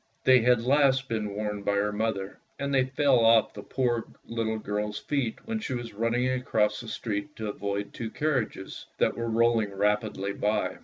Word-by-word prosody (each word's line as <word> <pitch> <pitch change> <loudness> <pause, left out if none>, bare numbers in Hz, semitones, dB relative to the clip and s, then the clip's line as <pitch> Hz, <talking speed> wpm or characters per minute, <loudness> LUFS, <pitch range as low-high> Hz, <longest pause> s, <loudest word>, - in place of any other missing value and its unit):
They 130 -1 +7
had 120 0 +3
last 135 0 +3
been 110 -2 -1
worn 105 0 -3
by 100 - 0
her 105 +1 +1
mother, 105 -2 -2 0.2
and 140 0 -2
they 130 -1 +4
fell 135 -1 +3
off 115 -1 +5
the 105 - -8
poor 120 0 -1 0.2
little 115 -1 -2
girl's 105 0 -3
feet 135 -6 -2
when 225 -1 -2
she 135 -11 -3
was 120 -2 -6
running 115 +4 0
across 110 -4 +1
the 120 - -10
street 110 +5 -4
to 110 -2 -4
avoid 100 0 -3
two 115 - -4
carriages 125 -9 -2
that - - +2
were 115 0 -3
rolling 115 -2 +2
rapidly 105 -1 0
by. 105 +2 -1
115 Hz, 185 wpm, -28 LUFS, 105-125 Hz, 0.2 s, They